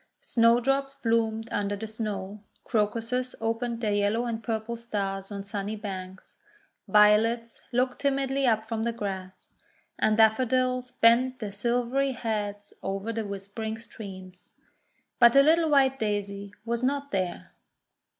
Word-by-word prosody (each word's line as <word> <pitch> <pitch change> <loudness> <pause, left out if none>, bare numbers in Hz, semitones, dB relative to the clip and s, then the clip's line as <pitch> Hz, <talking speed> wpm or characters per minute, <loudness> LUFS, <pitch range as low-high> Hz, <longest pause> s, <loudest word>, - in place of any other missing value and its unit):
Snowdrops 260 +4 +2
bloomed 225 -3 0
under 205 0 -1
the 210 +2 -6
Snow, 210 -2 -5 0.2
Crocuses 230 +3 -1
opened 230 +1 -2
their 210 -3 +1
yellow 205 +4 +1
and 230 -1 -3
purple 225 0 -2
stars 200 -4 -3
on 200 -1 -5
sunny 205 +1 -4
banks, 190 -3 -8 0.5
Violets 215 +3 +4
looked 250 +1 0
timidly 275 -1 +1
up 220 -2 +2
from 225 -1 -2
the 235 +1 -1
grass, 190 -4 -6 0.5
and 215 0 +3
Daffodils 255 +3 +3
bent 250 +1 +4
their 210 -4 -5
silvery 245 +6 0
heads 205 -3 -4
over 195 +4 -3
the 225 -2 -3
whispering 200 +3 -5
streams. 190 -5 -11 0.7
But 235 -1 +7
the 275 - +7
little 320 +2 +4
white 270 -2 +4
Daisy 205 -1 -3
was 235 0 -1
not 280 +2 -1
there. 180 - -3
225 Hz, 130 wpm, -27 LUFS, 205-245 Hz, 0.7 s, But